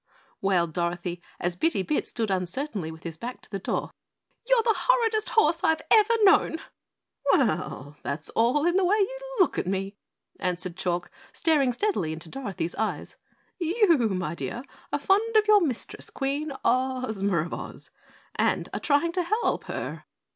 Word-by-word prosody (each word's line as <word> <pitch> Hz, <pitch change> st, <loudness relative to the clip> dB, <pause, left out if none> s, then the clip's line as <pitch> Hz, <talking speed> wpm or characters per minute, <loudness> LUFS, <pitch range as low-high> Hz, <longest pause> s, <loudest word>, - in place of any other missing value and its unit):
wailed 175 Hz, -4 st, +1 dB
Dorothy, 175 Hz, +1 st, -2 dB, 0.2 s
as 175 Hz, 0 st, -1 dB
Bitty 200 Hz, -, +1 dB
Bit 300 Hz, -, -1 dB
stood 225 Hz, -4 st, -2 dB
uncertainly 190 Hz, -, -2 dB
with 160 Hz, 0 st, -12 dB
his 165 Hz, -2 st, -6 dB
back 245 Hz, +7 st, -6 dB
to -, -, -17 dB
the 195 Hz, -, -3 dB
door. -, -, -2 dB, 0.6 s
"You're -, -, +4 dB
the 450 Hz, -, +3 dB
horridest 455 Hz, -4 st, +2 dB
horse 335 Hz, -6 st, +3 dB
I've 320 Hz, 0 st, +2 dB
ever 440 Hz, +1 st, +6 dB
known!" 390 Hz, -5 st, +5 dB, 0.7 s
"Well, 145 Hz, +1 st, 0 dB
that's 145 Hz, +2 st, -3 dB
all 250 Hz, +7 st, +2 dB
in 350 Hz, +2 st, +3 dB
the 385 Hz, -, +3 dB
way 385 Hz, +4 st, +3 dB
you 435 Hz, +5 st, 0 dB, 0.2 s
look 370 Hz, -, +3 dB
at -, -, -3 dB
me," 195 Hz, +1 st, -2 dB, 0.4 s
answered 180 Hz, -1 st, -2 dB
Chalk, 175 Hz, -2 st, -2 dB, 0.2 s
staring 290 Hz, -6 st, +2 dB
steadily 240 Hz, -, -1 dB
into 160 Hz, +1 st, -8 dB
Dorothy's 200 Hz, -9 st, -4 dB
eyes. 220 Hz, 0 st, -2 dB, 0.4 s
"You, 350 Hz, +1 st, +4 dB
my 185 Hz, -5 st, -2 dB
dear, 235 Hz, +8 st, -5 dB, 0.3 s
are -, -, +1 dB
fond 440 Hz, +4 st, +2 dB
of 425 Hz, 0 st, +4 dB
your 420 Hz, -1 st, +7 dB
Mistress, 270 Hz, -9 st, -3 dB
Queen 285 Hz, +2 st, -2 dB
Ozma 250 Hz, -7 st, +1 dB
of -, -, -7 dB
Oz, -, -, -8 dB, 0.4 s
and -, -, 0 dB
are -, -, -2 dB
trying 295 Hz, +3 st, +2 dB
to 360 Hz, -, 0 dB
help 430 Hz, +7 st, 0 dB
her. -, -, -5 dB
255 Hz, 160 wpm, -26 LUFS, -, 0.7 s, your